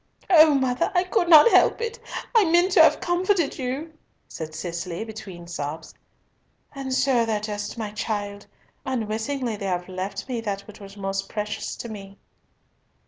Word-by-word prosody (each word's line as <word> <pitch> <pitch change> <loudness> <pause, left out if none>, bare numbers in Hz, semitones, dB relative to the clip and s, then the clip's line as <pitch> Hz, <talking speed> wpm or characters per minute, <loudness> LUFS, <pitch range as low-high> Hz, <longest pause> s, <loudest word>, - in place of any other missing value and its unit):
"O 310 -3 +7
mother, 255 -2 +1
I 355 - +4
could 355 -1 0
not 320 +7 +9
help - - +4
it! 465 0 -4 0.3
I 450 -4 +5
meant 345 +3 +3
to - - +6
have - - +6
comforted 350 -3 0
you," 270 +5 -4 0.3
said 155 -1 -7
Cicely, 170 +3 -4
between 210 -5 -9
her - - -13
sobs. 155 -2 -6 0.8
"And 270 -2 -5
so 255 -2 +2
thou 225 -2 0
dost, 210 +1 -5
my 215 -2 -4
child. 205 -1 -4 0.4
Unwittingly 235 0 -2
they 200 - -4
have 180 -1 -2
left 185 +4 -5
me 245 -3 -3
that 200 -3 -3
which 215 +1 -14
was 200 0 -12
most 195 0 -3
precious 210 -1 -4
to - - -7
me." 200 -3 -9
220 Hz, 165 wpm, -24 LUFS, 195-280 Hz, 0.8 s, not